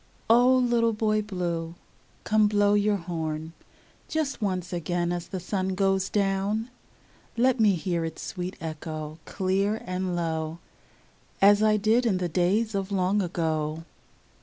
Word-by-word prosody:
0 240 +2 +6
little 240 -2 +2
Boy 215 0 +1
Blue, 175 -5 -3 0.5
come 215 0 +3
blow 205 0 +3
your 205 0 +3
horn 160 -3 -4 0.5
Just 305 -6 -2
once 185 -3 -2
again 175 +1 -1
as 175 0 -3
the 190 - -5
sun 185 +1 -2
goes 195 0 +1
down; 205 +3 0 0.7
Let 255 +1 +3
me 210 -3 +5
hear 170 0 -2
its 160 0 -5
sweet 180 +4 -5
echo, 155 -1 -6
clear 195 +3 0
and 185 0 -2
low, 160 -1 -2 0.8
As 205 +1 +6
I 215 0 +4
did 225 +4 +2
in 195 -5 +2
the 180 -1 -1
days 190 +7 +1
of 195 0 -2
long 195 +1 +1
ago. 160 -3 -2
190 Hz, 140 wpm, -26 LUFS, 170-210 Hz, 0.8 s, 0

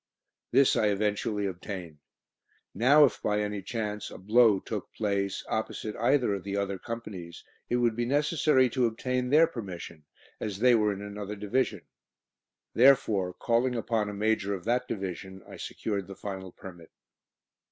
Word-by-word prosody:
This 135 +2 +4
I 105 - +3
eventually 105 0 0
obtained. 90 -4 -6 0.7
Now 140 +8 +6
if 125 - -2
by 105 0 +1
any 105 -1 -2
chance 105 0 -4
a - - -10
"blow" 110 +1 +4
took - - -6
place 100 -2 -1
opposite 110 -1 -3
either 120 -2 +2
of 100 -2 -4
the 100 0 -3
other 100 -1 -2
Companies, 100 -8 -7 0.3
it - - +1
would 120 -2 +2
be 120 +1 -1
necessary 145 -1 +3
to 125 -1 +2
obtain 125 +2 -2
their 155 +4 +6
permission, 90 - -8 0.3
as 105 -3 -4
they 125 +3 +5
were 105 -2 +3
in 100 0 -5
another 105 0 -6
Division. 105 0 -1 0.9
Therefore, 115 -8 +4
calling 120 +5 +1
upon 115 -2 -1
a - - -5
major 105 -1 0
of 90 - -9
that 125 +2 +1
Division, 95 -1 -5
I - - -10
secured 100 -3 -4
the 100 - -9
final 95 -2 -6
permit. 85 -3 -12
105 Hz, 155 wpm, -28 LUFS, 100-120 Hz, 0.9 s, Now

